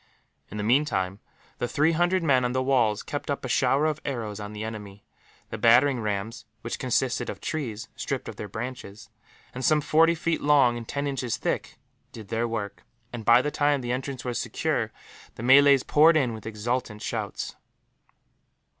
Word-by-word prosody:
In 105 - -7
the 105 - -2
meantime, 105 -6 +1 0.4
the 120 - -1
three 150 +4 +2
hundred 175 +2 +1
men 130 -5 +3
on 125 0 0
the 130 0 0
walls 120 -6 +2
kept - - -5
up - - -2
a - - -2
shower 140 +3 +2
of 155 -1 -1
arrows 110 -6 -4
on 105 0 -6
the 105 0 -6
enemy. 105 -2 -8 0.5
The 110 - -5
battering 120 +4 +5
rams, 105 +1 -3 0.2
which 115 - -5
consisted 130 0 0
of - - -6
trees 120 -9 -4
stripped - - -4
of - - -7
their 105 - -6
branches, 110 -1 -7 0.4
and 130 - -6
some 155 +2 +4
forty 165 +3 +3
feet 165 0 -1
long 140 -5 +4
and 115 -1 -7
ten 140 0 -3
inches 135 -5 -2
thick, - - -3 0.3
did 110 -3 -11
their 115 +1 0
work 105 -3 -5 0.3
and, 120 -2 -5
by 120 +3 +5
the 150 - -1
time 145 -2 +1
the 120 -1 -3
entrance 130 0 -4
was 120 -2 -2
secure, - - -1 0.4
the 115 - -8
Malays 140 +1 +6
poured 160 +2 +5
in 125 -6 +1
with 110 -1 -8
exultant 110 0 -3
shouts. - - -4
125 Hz, 180 wpm, -26 LUFS, 110-140 Hz, 0.5 s, Malays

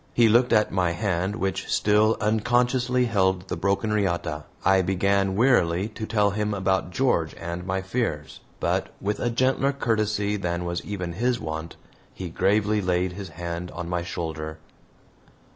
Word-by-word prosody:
He 120 -1 +6
looked 120 +3 +4
at 105 -2 +3
my 90 -3 +1
hand, 95 0 -1
which 95 -2 -2
still 105 +1 +3
unconsciously 120 +3 +2
held 95 -4 +1
the - - -1
broken 100 +5 0
riata. 85 -7 -1 0.2
I 95 0 +5
began, 95 +1 +1
wearily, 100 -5 +3
to 110 0 -6
tell 105 -2 +2
him 105 0 -1
about 95 -1 0
George 90 - 0
and 85 +2 -6
my 95 0 -1
fears, 95 -8 -3 0.2
but - - 0
with 105 +1 -2
a 120 - 0
gentler 130 +3 +2
courtesy 105 -5 0
than 90 -2 -2
was 85 0 -3
even 90 -4 -4
his 120 +5 0
wont, 80 -1 -5 0.4
he 90 -2 -5
gravely 105 +4 +2
laid 90 -1 0
his 100 +1 -7
hand 85 0 -5
on 85 0 -5
my 90 0 -1
shoulder. 80 -2 -5
95 Hz, 160 wpm, -25 LUFS, 85-110 Hz, 0.4 s, He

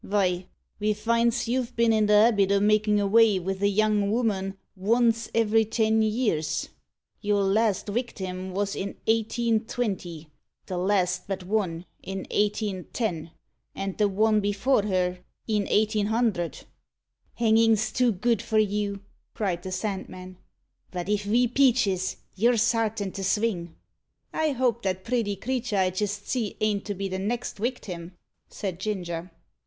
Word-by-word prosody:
Vy, 185 -3 0 0.3
ve 210 0 +1
finds 235 +2 +1
you've 245 0 -1
been 230 -1 +3
i' 215 - +3
the 210 0 +3
habit 210 -2 +5
o' 200 - +4
makin' 210 0 +3
avay 210 +1 +4
with 190 +1 -3
a 200 - +4
young 205 0 +2
ooman 200 -5 0 0.2
vonce 230 +3 +2
every 225 0 +4
ten 220 0 +1
years. 215 -8 0 0.5
Your 205 -1 +1
last 205 +1 +2
wictim 190 -5 -4
wos 200 +1 -1
in 195 +1 -4
1820 220 -6 -1 0.4
the 185 - -4
last 185 -1 +1
but 195 -2 -3
one, 180 -4 -1 0.2
in 195 0 -5
1810 205 -4 -1 0.5
and 195 -1 -3
the 210 - +4
one 215 +2 +2
before 205 +5 +2
her, 185 -3 0 0.3
in 210 -3 0
1800." 215 -3 0 0.7
"Hangin's 225 -1 +3
too 250 +1 +2
good 225 +3 0
for 220 - -1
you!" 205 -1 0 0.3
cried 190 -6 -1
the 185 - -6
Sandman; 185 -2 -5 0.5
"but 180 0 -5
if 210 0 0
ve 240 +4 +3
peaches 235 -8 +2 0.2
you're 235 +4 +3
sartin 225 -3 +1
to 195 - -6
sving." 190 -4 -1 0.6
"I 315 -2 +1
hope 245 -2 +1
that 190 -1 -2
pretty 225 -3 0
creater 245 -1 -2
I 185 -1 +2
jist 205 +2 -3
see 230 -6 -2
ain't 210 -2 0
to 205 - -3
be 195 +1 -3
the 190 0 -3
next 235 +5 -3
wictim?" 190 -7 -4 0.4
said 185 -4 -5
Ginger. 180 -4 -3
210 Hz, 140 wpm, -26 LUFS, 190-225 Hz, 0.7 s, habit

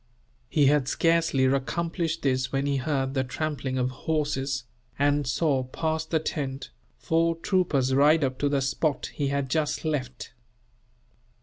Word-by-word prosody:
He 150 -3 +3
had 140 -1 +3
scarcely 165 -3 +2
accomplished 165 +5 -1
this 130 -2 0
when 135 0 0
he 140 -1 +1
heard 135 -1 -1
the 130 -1 +1
trampling 130 0 -3
of 125 0 0
horses; 140 -2 -2 0.3
and 145 -1 +2
saw, 140 0 +1
past 160 +4 -3
the 165 - +2
tent, 135 -3 -4 0.3
four 165 +1 +1
troopers 165 -7 +1
ride 150 +3 +5
up 130 -1 -1
to 145 - +1
the 140 -1 +1
spot 140 +2 -1
he 145 - -1
had 140 0 -1
just 155 +3 -1
left. 130 -5 -3
140 Hz, 145 wpm, -26 LUFS, 135-160 Hz, 0.3 s, ride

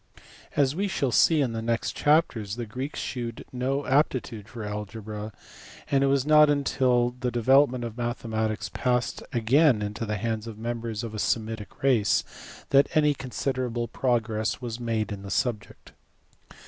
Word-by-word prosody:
As 140 -2 +3
we 200 +3 0
shall 140 -9 -1
see 155 +5 +4
in 130 -4 0
the 115 - -3
next 115 0 -1
chapters 130 -10 +1
the 120 -1 -4
Greeks 130 +7 -5
shewed 120 -3 -5
no 135 +3 -1
aptitude 120 -6 0
for 115 -1 -7
algebra, 105 +1 -6 0.6
and 135 -1 +3
it - - +3
was 135 -1 +2
not 150 0 +6
until 130 -4 +2
the 125 0 -3
development 130 +1 +3
of 115 -2 -5
mathematics 110 -3 -2
passed 125 -2 0
again 125 0 +3
into 105 +2 -4
the 105 0 -1
hands 110 0 -3
of 110 -2 -7
members 115 -1 -4
of 115 -2 -5
a 110 - -5
Semitic 110 0 -2
race 120 -7 +3 0.5
that 140 0 +5
any 150 -1 +4
considerable 125 -3 -3
progress 115 -3 -1
was 120 -2 -5
made 115 -3 -1
in 100 -1 -5
the 100 - -8
subject. 105 +4 -3
120 Hz, 160 wpm, -26 LUFS, 110-135 Hz, 0.6 s, not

